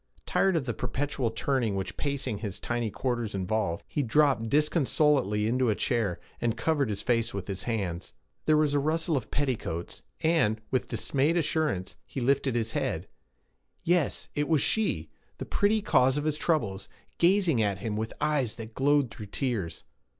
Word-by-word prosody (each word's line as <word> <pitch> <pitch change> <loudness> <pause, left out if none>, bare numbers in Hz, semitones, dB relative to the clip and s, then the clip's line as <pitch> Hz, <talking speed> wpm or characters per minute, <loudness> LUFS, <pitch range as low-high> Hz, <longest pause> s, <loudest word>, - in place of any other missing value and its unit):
Tired 195 -2 +2
of 155 -5 0
the 120 - -1
perpetual 140 -2 -2
turning 115 -2 0
which 95 0 -3
pacing 135 -7 -2
his 100 -4 -5
tiny 120 -2 -1
quarters 120 -2 -2
involved, 95 -2 -1
he 145 - -1
dropped 130 -2 +2
disconsolately 145 - +2
into 125 +2 +2
a 105 - +2
chair, 105 -8 0 0.2
and 115 -1 0
covered 145 -4 +1
his 100 -1 -3
face 115 -3 +1
with 100 - -4
his 100 -2 -5
hands. 95 -7 -3 0.3
There 155 0 +5
was 150 -2 +2
a 145 - +3
rustle 160 +3 0
of 130 - -2
petticoats, 120 - -2 0.2
and, 155 -10 +2
with 130 -2 0
dismayed 145 +5 +1
assurance, 155 - 0
he - - -5
lifted 135 0 +1
his 115 -1 0
head. 130 - -2 0.8
Yes, 175 -3 +1
it 145 0 0
was 160 -4 +3
she, 220 -1 0 0.3
the - - -5
pretty 210 0 +2
cause 130 -7 +4
of 145 - -1
his 155 -1 0
troubles, 105 - 0 0.3
gazing 175 - +4
at 100 -3 +1
him 105 +2 -3
with 110 +1 -2
eyes 145 -7 +1
that 115 -1 -8
glowed 140 -1 +2
through 105 -2 -8
tears. 105 - -2
130 Hz, 170 wpm, -28 LUFS, 110-150 Hz, 0.8 s, There